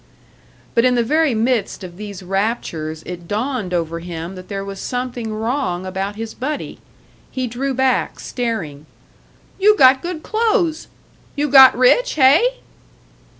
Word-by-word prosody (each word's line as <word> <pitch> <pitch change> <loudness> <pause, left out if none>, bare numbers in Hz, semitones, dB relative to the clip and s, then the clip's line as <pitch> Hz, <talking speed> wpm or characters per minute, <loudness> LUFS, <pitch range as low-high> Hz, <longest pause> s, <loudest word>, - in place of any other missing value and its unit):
But 230 - +3
in 250 0 +3
the 240 - +2
very 300 +1 +1
midst 225 -3 -1
of 175 -2 -9
these 200 -1 -8
raptures 180 -6 -3
it 175 -1 -8
dawned 220 -1 -2
over 165 -1 -2
him 170 +1 -6
that 185 -1 -11
there 195 -1 -5
was 195 -1 -7
something 245 -2 -4
wrong 220 -4 -2
about 195 +2 -4
his 225 0 -6
buddy. 290 +4 -5 0.5
He 260 -1 -3
drew 255 +3 -3
back, 260 0 0
staring. 175 - -4 0.7
"You 420 +2 +5
got 260 -2 +6
good 345 -2 -5
clothes! 420 -8 0 0.5
You 290 +1 -1
got 265 -2 +8
rich, 375 - +4
hey?" 315 - +4
235 Hz, 145 wpm, -19 LUFS, 190-270 Hz, 0.7 s, got